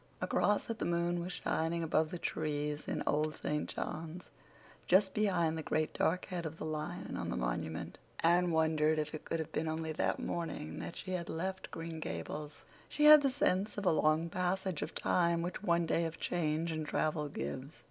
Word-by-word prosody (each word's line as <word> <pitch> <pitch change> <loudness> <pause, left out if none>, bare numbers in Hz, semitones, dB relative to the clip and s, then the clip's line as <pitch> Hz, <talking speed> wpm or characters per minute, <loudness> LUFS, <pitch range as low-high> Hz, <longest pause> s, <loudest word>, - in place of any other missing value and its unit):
Across 205 0 +1
it 230 - -5
the - - -1
moon 175 0 +1
was 180 +2 -4
shining 165 -1 -1
above 160 -1 +2
the 180 - -4
trees 150 -2 -2
in - - -1
Old 150 +1 +1
St. 150 0 -2
John's, 165 +3 -5 0.6
just 190 +1 +5
behind 180 -7 +2
the 160 - -3
great 155 0 0
dark 180 +3 +1
head 180 -2 -4
of 160 -1 -5
the - - -5
lion 155 -1 -4
on - - -3
the - - -2
monument. 60 +6 -3 0.2
Anne 175 +2 +4
wondered 160 -1 +3
if 150 0 -2
it 155 - -6
could - - -1
have 160 -2 -4
been 160 - -1
only 160 0 -2
that 155 - 0
morning 160 - -4
that - - -6
she 185 - -6
had 180 -2 -2
left 185 +3 -3
Green 165 0 -6
Gables. 145 - -5 0.3
She 300 - +2
had 300 0 +11
the 275 - +3
sense 210 -7 +1
of 205 - -3
a - - +5
long 155 +1 +3
passage 180 -1 -1
of - - -4
time 170 -1 +2
which 175 +2 -4
one 170 -3 +2
day 165 +1 +1
of 165 0 -5
change 165 -1 0
and 155 -1 -3
travel 150 -1 0
gives. 140 +2 -5
165 Hz, 200 wpm, -34 LUFS, 155-180 Hz, 0.6 s, had